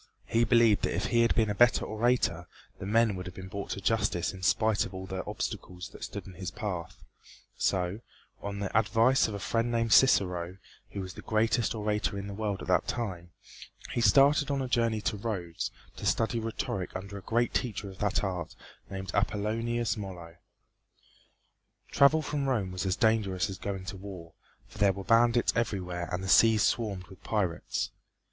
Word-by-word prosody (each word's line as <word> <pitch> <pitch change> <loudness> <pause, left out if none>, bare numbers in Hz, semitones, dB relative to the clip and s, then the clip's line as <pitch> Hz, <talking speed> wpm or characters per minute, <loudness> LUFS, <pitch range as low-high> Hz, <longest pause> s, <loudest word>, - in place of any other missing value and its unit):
He 115 +1 +2
believed 115 -4 +4
that - - -1
if - - -1
he 120 - +3
had 115 - +3
been 110 -2 +2
a - - 0
better 120 +4 +4
orator 110 -6 0 0.3
the 95 - -5
men 110 -1 +3
would 90 0 -6
have 90 - -9
been 95 0 -8
brought 100 +1 -5
to 100 - -4
justice 105 -5 0
in 95 - -10
spite 110 +3 +2
of 95 - -7
all 95 0 -6
the 95 0 -4
obstacles 105 -5 -5
that - - -11
stood - - -6
in 95 - -10
his 90 +1 -5
path; 95 -6 -5 0.5
so, 90 +2 0 0.4
on 100 0 -4
the 100 -1 -4
advice 115 +4 +4
of 105 - -5
a - - -4
friend 115 +3 0
named 115 -1 +1
Cicero, 90 -8 +4 0.3
who 100 - -5
was 95 -1 -7
the - - -10
greatest 115 +2 +1
orator 105 -1 -1
in 100 - -4
the 100 - -6
world 100 -2 -3
at - - -9
that - - +2
time, 95 -8 -3 0.6
he 120 - -1
started 140 +6 +5
on 140 -1 0
a 130 - -2
journey 115 -3 +1
to 105 - -1
Rhodes 95 -6 -3 0.3
to - - -6
study 115 +1 +1
rhetoric 110 -4 -3
under 100 +2 -6
a - - -13
great 120 +4 0
teacher 110 -4 -2
of 95 -2 -11
that 105 0 0
art 90 -4 -3 0.3
named 95 -1 -5
Appollonius 115 +3 0
Molo. 90 -5 -8 1.6
Travel 150 +3 +5
from 145 -3 -1
Rome 105 -8 0
was 90 +1 -3
as 90 - +1
dangerous 105 -5 +1
as 95 - -7
going 95 -2 -4
to 100 0 -6
war, 90 -4 -9 0.3
for 105 - -14
there 100 -2 +4
were 100 +1 -7
bandits 115 +2 +4
everywhere 90 -7 -2
and 90 +1 -2
the - - -4
seas 110 +1 +6
swarmed 100 -5 0
with 95 0 -16
pirates. 95 -6 -1
105 Hz, 190 wpm, -29 LUFS, 95-115 Hz, 1.6 s, seas